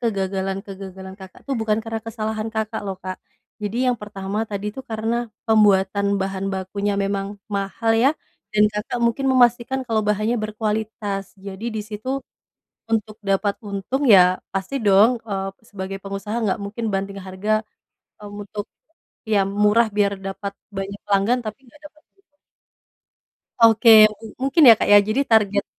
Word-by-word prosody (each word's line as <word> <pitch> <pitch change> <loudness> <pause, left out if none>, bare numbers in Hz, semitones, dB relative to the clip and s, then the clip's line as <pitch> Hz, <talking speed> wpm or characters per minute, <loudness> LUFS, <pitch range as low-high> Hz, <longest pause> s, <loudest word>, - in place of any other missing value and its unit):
kegagalan-kegagalan 195 -2 -4
Kakak 190 -1 -12
tuh, 275 - -1
bukan 215 -1 +1
karena 225 0 -4
kesalahan 220 -1 -3
Kakak 220 0 -2
loh, 195 - -4
Kak. 185 0 -5 0.5
Jadi 205 +2 -3
yang 250 - +1
pertama 200 -1 -5
tadi 200 0 -4
itu 265 - -7
karena 225 +1 -1 0.3
pembuatan 200 -2 +4
bahan 195 0 -3
bakunya 200 +2 -2
memang 195 0 -2 0.3
mahal 200 +3 -1
ya, 265 - +6 0.4
dan 210 0 +4
Kakak 210 +4 -3
mungkin 270 +4 -1
memastikan 245 +1 +3
kalau 220 -2 +1
bahannya 215 +3 +1
berkualitas. 215 -2 -3 0.2
Jadi 195 +2 -7
di 215 - -1
situ, 215 +3 -7 0.8
untuk 215 -1 -1
dapat 200 +1 +1
untung 200 +8 -2
ya, 195 - +9 0.3
pasti 195 +7 -3
dong, 200 +3 +6 0.2
eee, 195 -2 -2 0.2
sebagai 195 -1 -5
pengusaha 200 +2 -5
nggak 205 +1 0
mungkin 210 +3 -5
banting 195 +1 -3
harga, 190 +3 -3 0.7
eee, 205 - -9
untuk 205 +1 -6 0.7
ya 205 - +4 0.2
murah 220 +2 +4
biar 200 -1 +3
dapat 195 +1 -5 0.3
banyak 200 +1 -5
pelanggan, 205 +5 +2
tapi 215 +2 -5
nggak 295 +5 -20
dapat 305 0 -28 0.2
untung. 295 -7 -36 1.3
Oke. 225 +1 +5 0.3
Mu - - -12 0.2
mungkin 285 -2 +6
ya 225 - +11
Kak, - - -1
ya, 205 - +10
jadi 215 +6 0
target 205 -4 +3
210 Hz, 150 wpm, -22 LUFS, 195-225 Hz, 1.3 s, ya